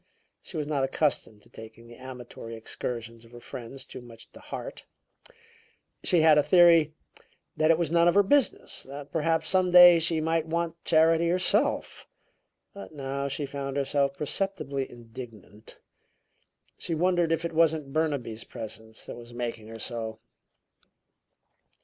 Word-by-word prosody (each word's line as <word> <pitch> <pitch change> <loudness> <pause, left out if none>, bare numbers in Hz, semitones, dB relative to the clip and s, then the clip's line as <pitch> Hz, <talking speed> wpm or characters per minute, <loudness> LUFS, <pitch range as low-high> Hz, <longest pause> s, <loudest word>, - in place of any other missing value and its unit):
She 175 - -8
was 150 - -2
not 145 -2 -1
accustomed 135 -6 -1
to - - -21
taking 110 +1 -12
the 120 - -13
amatory 125 -3 -9
excursions 115 0 -6
of 115 - -18
her 120 - -10
friends 125 +3 -9
too - - -10
much 115 -2 -14
to - - -14
heart; - - -8 1.2
she 175 -4 +3
had 155 -1 +6
a - - +6
theory 165 -2 +5 0.6
that 155 0 +2
it 165 - +5
was 165 -3 -1
none 170 0 +4
of 175 - +3
her 205 - +6
business, 275 +6 +1
that 140 +1 -10
perhaps 160 0 0
some 185 -1 +3
day 175 -1 +9
she 165 0 +1
might 160 0 0
want 170 0 -3
charity 165 +1 +4
herself. 185 +1 +1 0.7
But 200 -5 -10
now 140 0 -3
she 140 +2 -3
found 140 0 -5
herself 140 0 0
perceptibly 145 -4 -3
indignant. 115 -3 -12 1.0
She 165 - -2
wondered 175 0 +1
if 165 0 0
it 170 - -4
wasn't 155 -4 +1
Burnaby's 140 -8 -2
presence 110 0 -9
that - - -8
was 120 0 -12
making 115 -2 -5
her 115 0 -9
so. 110 -1 -4
145 Hz, 150 wpm, -27 LUFS, 120-165 Hz, 1.2 s, day